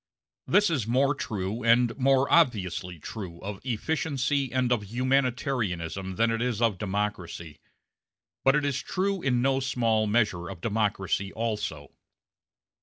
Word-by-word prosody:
This 205 -3 +4
is 130 -10 -1
more 135 +4 +3
true, 105 -4 -4
and 115 0 +4
more 135 0 +3
obviously 95 - +2
true, 85 +1 -7
of 100 0 -6
efficiency 135 +2 -1
and 130 -1 +1
of 120 -4 +2
humanitarianism 120 -7 -1
than 115 +2 +2
it 115 0 -1
is 120 -3 -1
of 115 -6 +1
democracy; 95 -7 -3 0.8
but 135 +1 +5
it 150 -1 +1
is 140 -2 -1
true 195 0 -1
in 125 -4 +1
no 135 0 +2
small 115 -5 +1
measure 105 -6 +1
of 95 -3 -8
democracy 100 -2 -1
also. 105 -11 -3
115 Hz, 135 wpm, -27 LUFS, 100-130 Hz, 0.8 s, but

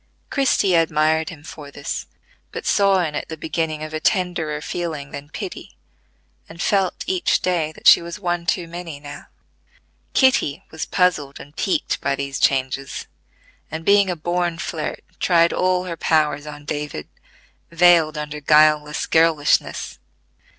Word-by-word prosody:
Christie 260 -9 +2
admired 160 -1 +2
him 155 -5 -11
for 150 -2 -10
this, 140 0 -5 0.4
but - - -6
saw 195 -2 +3
in 155 -3 -3
it 150 - -4
the 160 - -6
beginning 155 -1 -2
of 155 0 -7
a 155 - -2
tenderer 170 -5 0
feeling 155 -3 -5
than 145 +1 -8
pity, - - -8 0.7
and 165 +1 -12
felt 195 -1 0
each 370 -1 +1
day 170 -4 0
that - - -17
she - - +9
was 170 +4 -7
one 175 -2 -2
too 180 -3 0
many 170 -3 -7
now. 145 0 -10 0.9
Kitty 260 - +3
was 160 - -5
puzzled 155 -7 +1
and 145 +2 -13
piqued 195 - -1
by 140 - 0
these 140 0 -4
changes, 135 0 0 0.6
and 160 +1 -6
being 200 -1 +5
a 180 - -1
born 175 +1 -1
flirt 160 -2 -4 0.2
tried 170 -2 +3
all 185 0 +1
her 175 -2 -5
powers 150 -2 +1
on 150 -1 -9
David, 145 - -4 0.6
veiled 170 -2 +4
under 150 0 -5
guileless 150 0 +4
girlishness. 160 -3 +2
160 Hz, 150 wpm, -21 LUFS, 150-175 Hz, 0.9 s, she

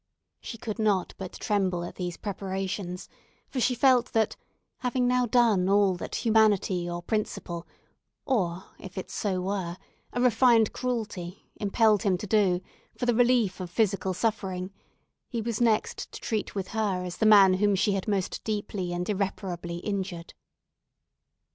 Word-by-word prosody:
She 230 - -7
could 215 0 -5
not 205 -4 +1
but 190 -2 -6
tremble 190 -4 0
at 175 - -6
these 180 -2 -4
preparations; 190 -2 -4 0.4
for 265 - -3
she 250 +1 +2
felt 250 -1 +3
that—having 245 +3 -2
now 250 0 +2
done 215 -6 +3
all 200 -1 +4
that 175 - -6
humanity, 205 -5 +3
or 175 0 -4
principle, 175 -5 -3 0.6
or, 190 -9 0 0.2
if 190 -1 -10
so 200 -3 -1
it - - -1
were, 185 -3 -2 0.3
a 245 - -3
refined 240 -2 +4
cruelty, 215 -8 -4
impelled 210 0 +3
him 195 -5 +2
to 195 - -6
do 195 -4 +2 0.4
for - - -2
the 240 - +3
relief 235 -5 +3
of 180 -2 -5
physical 190 -1 0
suffering—he 195 +2 -5
was 230 0 -2
next 225 -3 +1
to - - -8
treat 220 -3 -3
with 195 -2 -3
her 205 -5 -1
as 175 -1 -6
the 220 - +3
man 200 -3 +8
whom 205 +1 +2
she 200 +2 +2
had 195 -1 -2
most 195 -3 -1
deeply 205 -4 -3
and 175 0 -3
irreparably 190 -4 -3
injured. 190 -4 -4
200 Hz, 150 wpm, -27 LUFS, 185-220 Hz, 0.6 s, man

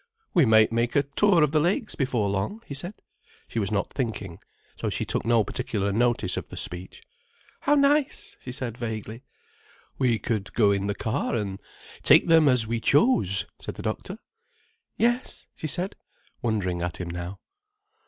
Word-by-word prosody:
"We 170 -6 +5
might 110 -1 +5
make 115 +1 0
a 145 - +4
tour 165 +5 +3
of 150 - +2
the 155 - +3
Lakes 185 +7 0
before 125 -7 0
long," 100 - -2
he - - -7
said. 175 +9 -5 0.5
She 115 - -3
was 100 -2 -1
not 100 -2 -1
thinking, 110 -9 -4 0.4
so - - -3
she - - -2
took - - -2
no 115 -1 +4
particular 100 -1 -2
notice 115 -3 +1
of - - -5
the - - -9
speech. 90 +2 -4 0.6
"How 290 - +3
nice!" 285 0 +2
she 125 - -7
said 125 -3 -4
vaguely. 110 0 -5 0.8
"We 125 -4 +3
could 105 -1 -3
go 105 -4 +4
in 100 0 0
the 100 - -1
car, 120 +5 -1
and 100 -3 -3 0.4
take - - +6
them 165 -3 +5
as 125 -3 +3
we 115 +1 -1
chose," 115 - +3 0.2
said - - -6
the - - -8
doctor. - - -4 0.8
"Yes," 240 +3 0
she 155 - -5
said, 180 +6 -1 0.5
wondering 95 -7 -1
at 85 -1 -3
him 90 - -5
now. 90 +2 -6
115 Hz, 175 wpm, -26 LUFS, 100-150 Hz, 0.8 s, take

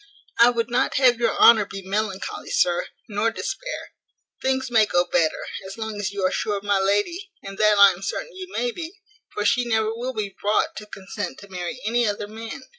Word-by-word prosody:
I 235 +1 +8
would 235 -1 -1
not 255 +2 +1
have 250 -3 +4
your 235 - +1
honour 225 -3 +7
be 195 0 -8
melancholy, 195 0 -3
sir, 175 -1 +1 0.2
nor 210 +1 0
despair; - - -5 0.5
things 265 -1 0
may 220 -3 +5
go 175 -2 +2
better, 165 -2 0 0.2
as 195 - -9
long 220 -1 -5
as 200 -2 -1
you 200 -2 -2
are 185 - +2
sure 210 -1 -1
of 200 - -8
my 205 -1 +2
lady, 205 - 0
and 195 0 -7
that 215 -1 +5
I 200 -1 +9
am 180 0 -9
certain 430 - -4
you 370 0 -8
may 240 +1 -1
be; 335 +6 -7 0.4
for 210 - -3
she 245 +4 +3
never 220 -2 0
will 245 +3 -4
be 205 -4 -4
brought 210 +1 +1
to 210 - -8
consent 195 -1 -6
to 200 - -13
marry 180 +6 -5
any 235 +1 +2
other 205 0 -2
man. 225 +5 -8
215 Hz, 210 wpm, -23 LUFS, 200-240 Hz, 0.5 s, I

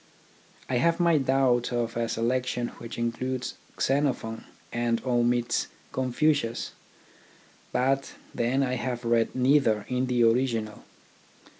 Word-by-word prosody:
I 130 - 0
have 170 +6 +2
my 170 -3 +4
doubts 130 -2 +2
of 120 -1 -1
a 115 -1 -1
selection 125 +1 -1
which 115 - -7
includes 125 +2 -2 0.3
Xenophon 130 -5 0 0.3
and 120 -1 +1
omits 120 -1 +1 0.2
Confucius, 130 -1 0 1.0
but 135 +2 0 0.2
then 125 +4 +1
I 130 -1 -1
have 120 -1 -3
read 115 -1 +2
neither 125 -5 +3
in 125 0 0
the 125 -1 +2
original. 115 -2 +1
125 Hz, 115 wpm, -27 LUFS, 115-130 Hz, 1.0 s, my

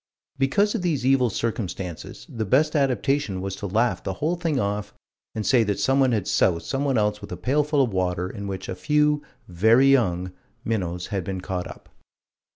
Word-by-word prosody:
Because 200 +10 +2
of 230 - -2
these 155 -8 -1
evil 130 -2 +4
circumstances 95 -6 -4
the 115 - -4
best 145 +10 +2
adaptation 135 -5 +1
was 95 0 -4
to 100 - -4
laugh 115 +5 0
the 95 - -3
whole 160 - 0
thing 165 -5 -1
off 100 -1 -2 0.4
and 110 -1 -3
say 125 -3 +4
that 100 -2 -1
someone 135 -1 +3
had 105 -5 -1
soused 85 -3 +2
someone 135 -1 0
else 105 -1 0
with - - -9
a - - -4
pailful 145 +2 +2
of 115 -6 -2
water 90 -1 -1
in 100 +1 -7
which 95 -1 -5
a - - -3
few 150 +10 +2 0.3
"very 110 +9 +4
young" 90 -8 +1 0.3
minnows 90 -6 -2
had 95 -2 -1
been 95 +1 -4
caught 90 -1 -4
up. - - -12
110 Hz, 185 wpm, -24 LUFS, 95-135 Hz, 0.4 s, evil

